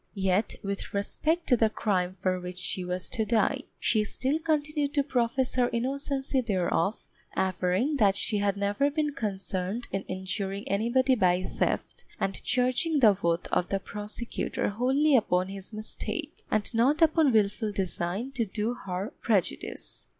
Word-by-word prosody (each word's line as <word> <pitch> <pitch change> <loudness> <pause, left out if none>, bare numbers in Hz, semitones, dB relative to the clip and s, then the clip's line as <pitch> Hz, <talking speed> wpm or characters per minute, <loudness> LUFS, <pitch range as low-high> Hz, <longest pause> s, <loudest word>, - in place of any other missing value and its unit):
Yet 195 +1 +1
with 200 0 -4
respect 315 +12 0
to 250 - +4
the 225 -2 +3
crime 185 -4 0
for 185 0 -1
which 180 0 -7
she 180 0 -3
was 180 0 -3
to 230 -3 +1
die, 220 -1 +1
she 215 -2 +2
still 265 +8 0
continued 300 -2 0
to 285 - +3
profess 255 -1 0
her 245 -1 +2
innocency 270 +2 -1
thereof, 195 -2 0 0.3
averring 190 - +1
that 200 -5 +4
she 210 +1 +1
had 200 -1 +1
never 205 +8 +1
been 295 0 -1
concerned 195 0 -3
in 195 - -1
injuring 190 +2 -3
anybody 240 +6 +2
by 185 -5 +3
theft, - - -2 0.2
and 195 0 -1
charging 255 +5 +2
the 215 -6 +6
oath 170 0 +1
of 180 - +1
the 195 - 0
prosecutor 210 +4 -3
wholly 265 +7 +3
upon 185 -5 +2
his 195 +1 -8
mistake, 215 0 -4
and 215 +2 0
not 275 +8 +3
upon 315 -3 +4
wilful 215 0 +2
design 195 +4 -2
to 265 -4 0
do 215 +3 -2
her 195 0 -5
prejudice. 195 - -1
215 Hz, 155 wpm, -28 LUFS, 190-260 Hz, 0.3 s, the